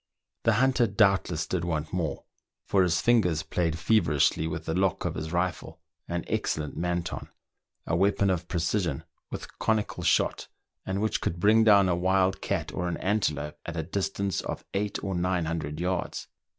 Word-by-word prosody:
The 115 - +5
hunter 125 +1 +3
doubtless 100 -5 +2
did 90 -3 -2
want 80 -3 -2
more, 80 -6 -2 0.4
for 95 - +3
his 85 -2 +2
fingers 90 -10 +3
played 80 -2 -1
feverishly 80 -4 +2
with 80 0 -4
the 80 - -1
lock 95 0 0
of - - -1
his 80 0 -5
rifle, 85 -2 -2 0.3
an 85 0 -2
excellent 75 -2 -2
Manton, 85 0 -3 0.6
a 80 - 0
weapon 100 +2 +2
of 90 -1 -2
precision 85 -3 -1 0.3
with - - -8
conical 110 -2 0
shot, - - +1 0.4
and 95 +2 -1
which 110 - 0
could 85 - -2
bring 110 +4 +5
down 100 -3 +6
a 90 - +2
wild 95 +1 +2
cat - - -2
or 90 - -2
an 85 - -2
antelope 75 -8 -1
at 85 0 -6
a 80 - -1
distance 100 +1 -2
of - - -6
eight 100 +1 -1
or 95 - -2
nine 90 -1 0
hundred 80 -2 -3
yards. 90 0 -2
90 Hz, 170 wpm, -27 LUFS, 80-100 Hz, 0.6 s, down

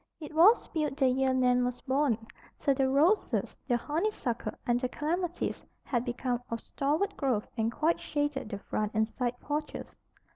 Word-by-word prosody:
It 305 -1 -8
was 365 +9 +6
built 305 -4 -1
the 270 -3 +4
year 265 +1 +2
Nan 250 -1 +3
was 250 0 -2
born, 260 -5 +1 0.3
so 280 - +2
the 265 0 +1
roses, 315 +10 +2
the 240 -3 +3
honeysuckle, 295 - -2
and 240 0 +2
the 255 0 -1
clematis 345 +5 -2 0.2
had 240 -2 -1
become 245 0 -1
of 230 - -2
stalwart 295 - -1
growth 255 -7 0
and 225 -1 0
quite 315 +7 +1
shaded 290 -5 -2
the 205 - -4
front 210 +1 -3
and 220 0 +3
side 245 +1 -3
porches. 300 +1 -4
265 Hz, 170 wpm, -30 LUFS, 245-300 Hz, 0.3 s, was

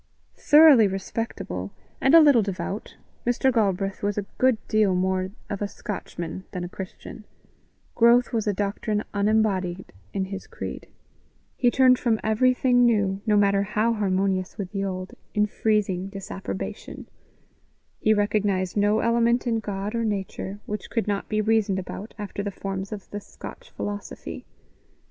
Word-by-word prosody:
Thoroughly 295 -7 +7
respectable, 190 - -4 0.3
and 270 +4 +5
a - - +11
little 285 -7 +6
devout, 195 +1 -4 0.3
Mr. 245 +2 +2
Galbraith 195 -3 0
was 205 0 -1
a 205 - -1
good 255 -3 +4
deal 210 -4 +3
more 185 0 0 0.2
of 200 - -5
a 205 - 0
Scotchman 185 -4 -6
than 180 - -3
a 175 - -5
Christian; 190 +4 -9 0.7
growth 240 +1 +4
was 220 -2 0
a - - +3
doctrine 205 +2 -2
unembodied 200 -3 0 0.2
in 190 - -1
his 195 0 -7
creed; - - -7 0.7
he 245 - +3
turned 255 0 +5
from 225 -3 +1
everything 245 +3 +3
new, 205 -5 +2
no 210 -1 +4
matter 200 -1 +3
how 215 +3 +1
harmonious 190 -3 0
with 190 -2 -5
the 195 -1 -2
old, 185 -1 -4 0.2
in 210 0 +4
freezing 205 -4 0
disapprobation; 195 -1 -6 0.9
he 215 - +2
recognized 205 -3 +1
no 210 +1 +3
element 235 +1 +2
in 230 -2 +1
God 205 0 -4
or 230 0 0
nature 200 -1 -3
which 210 -1 -5
could 225 -2 -1
not 200 -1 -2
be 215 0 +1
reasoned 215 -2 +2
about 190 +3 -7
after 205 -1 -5
the 205 - -2
forms 195 0 -5
of 205 -3 -7
the 205 - -4
Scotch - - -11
philosophy. 205 - -6
205 Hz, 150 wpm, -25 LUFS, 195-225 Hz, 0.9 s, a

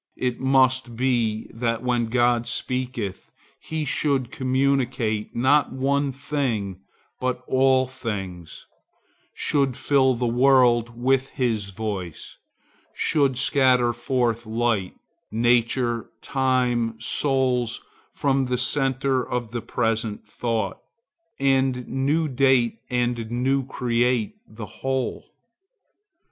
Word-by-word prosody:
It 125 -1 -2
must 130 -2 +2
be 115 -3 0
that 115 0 -2
when 120 -2 +1
God 120 0 +2
speaketh 125 -6 -3 0.3
he 160 -1 -4
should 135 -3 0
communicate, 130 -5 0
not 140 +5 +3
one 140 +1 0
thing, 120 -9 -2 0.4
but 125 0 -2
all 130 0 +3
things; 95 -10 -6 0.7
should 140 -4 +1
fill 130 -3 +3
the 120 +1 -2
world 120 -1 +3
with 135 +1 +2
his 115 -6 -1
voice; 100 -5 -6 0.6
should 140 -4 +1
scatter 130 -3 +3
forth 120 -2 -1
light, 110 -4 0 0.3
nature, 120 +1 +1
time, 125 -4 0
souls, 130 -4 0 0.3
from 135 -2 0
the 125 0 0
centre 135 0 +1
of 120 -3 -4
the 120 -1 -3
present 115 -1 -2
thought; 115 -2 -2 0.6
and 135 -2 +1
new 145 +5 0
date 130 -3 +2
and 120 -2 -1
new 130 +3 +1
create 120 -3 0
the 110 0 -8 0.2
whole. 130 -2 -2
125 Hz, 105 wpm, -24 LUFS, 115-130 Hz, 0.7 s, not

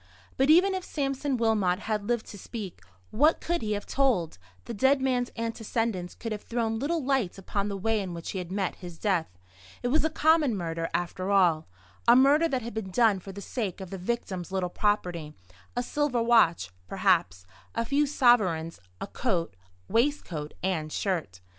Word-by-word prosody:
But 270 +2 +2
even 365 +5 +6
if 375 -1 -3
Sampson 275 -3 -2
Wilmot 210 -5 +1
had 210 -2 -2
lived 235 -2 0
to 205 - -9
speak, 205 -2 -7 0.3
what 300 +8 +3
could 345 -3 -1
he 215 -1 -1
have 205 0 -4
told? 195 - 0 0.3
The - - -5
dead 265 +6 +3
man's 255 -2 0
antecedents 225 -4 -2
could 230 - -6
have 210 -1 -3
thrown 225 -2 -2
little 315 +4 -1
light 265 -10 0
upon 200 +1 -2
the 200 - -3
way 220 +3 0
in 180 -3 -5
which 170 - -6
he 190 - -3
had 180 -1 -6
met 195 -1 -2
his 175 -2 -9
death. 185 -5 0 0.6
It 245 - 0
was 295 +3 +3
a 315 - +2
common 310 -6 +3
murder, 165 -2 -3
after 185 +2 -2
all; 175 -6 +3 0.4
a 235 - +8
murder 285 +5 +5
that 260 -6 -2
had 235 - -6
been 215 -3 -4
done 210 0 +3
for 195 +2 -9
the 200 +1 -8
sake 205 -3 -4
of 190 -2 -8
the 195 - -5
victim's 190 -3 -3
little 190 -2 -1
property; 175 -8 -1 0.4
a 245 - 0
silver 260 -3 0
watch, 170 - +4 0.2
perhaps; 90 +4 +1 0.3
a 230 - 0
few 285 +4 +2
sovereigns; 205 - +3 0.2
a - - -3
coat, 180 - -2 0.3
waistcoat, 225 - -1
and 160 -5 -1
shirt. 155 - -2
215 Hz, 185 wpm, -28 LUFS, 180-255 Hz, 0.6 s, a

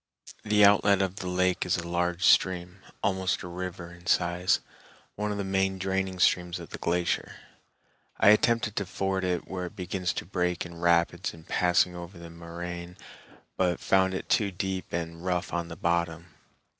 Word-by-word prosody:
The 105 -1 +5
outlet 100 -1 +5
of 95 0 -3
the 95 - -5
lake 90 0 +1
is 90 - +1
a 85 0 -5
large 90 +1 -1
stream, 90 0 +3 0.2
almost 95 -1 0
a - - -6
river 90 -1 -6
in 90 0 -15
size, 85 +1 +2 0.5
one 105 0 -2
of 105 - -3
the 100 - -2
main 95 0 0
draining 95 0 -1
streams 90 -1 +2
of - - -10
the - - -6
glacier. 85 0 -1 0.8
I - - +6
attempted 110 0 +3
to 100 - -1
ford 95 0 -1
it 90 -2 -1
where 90 -1 -4
it 95 - -13
begins 90 -1 -2
to - - -4
break 90 -1 -1
in 85 -1 -10
rapids 85 -1 +2
in 80 - -14
passing 90 +1 +2
over 85 +1 -8
the 85 -1 -10
moraine, 85 +1 -7 0.6
but 90 -2 +1
found 95 0 +2
it - - -5
too 105 -3 +2
deep 95 0 -4
and 85 0 -4
rough 90 -1 -1
on 85 -1 -1
the 80 - -8
bottom. 85 0 -1
90 Hz, 180 wpm, -28 LUFS, 85-95 Hz, 0.8 s, I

